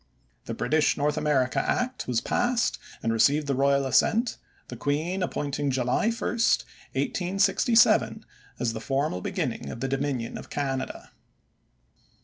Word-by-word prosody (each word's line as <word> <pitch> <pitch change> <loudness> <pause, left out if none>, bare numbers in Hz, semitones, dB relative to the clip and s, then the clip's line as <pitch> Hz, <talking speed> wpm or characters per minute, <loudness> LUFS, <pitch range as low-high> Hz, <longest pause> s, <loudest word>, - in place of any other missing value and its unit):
The - - -4
British 155 0 +1
North 150 +1 +1
America 130 -4 +1
Act 250 +1 -1
was 120 -2 +1
passed, 245 -1 0 0.2
and 115 - +1
received 140 +7 +3
the 140 - 0
royal 140 +1 +2
assent, 220 - +2 0.3
the - - -7
queen 160 +7 -1
appointing 145 -4 -2
July 130 - +1
1, 230 - -3
1867 220 -1 +1 0.3
as 115 -2 -1
the 110 - -5
formal 135 -6 -1
beginning 70 - -3
of 115 - -7
the 135 - -2
Dominion 135 -3 -2
of - - -11
Canada. 135 -2 -3
140 Hz, 130 wpm, -26 LUFS, 130-180 Hz, 0.3 s, received